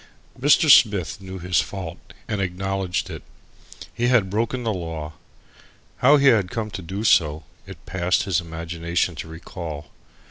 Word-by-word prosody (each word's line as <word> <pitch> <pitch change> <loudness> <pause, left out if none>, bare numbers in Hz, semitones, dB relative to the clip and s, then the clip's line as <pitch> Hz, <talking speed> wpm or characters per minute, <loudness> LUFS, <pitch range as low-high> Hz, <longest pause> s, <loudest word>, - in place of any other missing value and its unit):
Mr. 145 +4 +4
Smith 100 - +5
knew 95 0 -8
his 90 0 +1
fault 90 -3 -7 0.3
and 105 -4 -2
acknowledged 95 0 -2
it. - - -7 0.7
He 120 - 0
had 115 -7 +3
broken 115 +4 -1
the 110 -2 0
law. 80 -4 -5 0.8
How 145 +4 +6
he 140 -1 +5
had 100 -7 +3
come 110 +1 -4
to 95 - -6
do 95 +5 -5
so, 80 -7 +3 0.2
it - - -12
passed 90 -1 0
his 90 -3 0
imagination 85 +1 -2
to 80 - -6
recall. 80 -3 -8
95 Hz, 150 wpm, -23 LUFS, 85-105 Hz, 0.8 s, How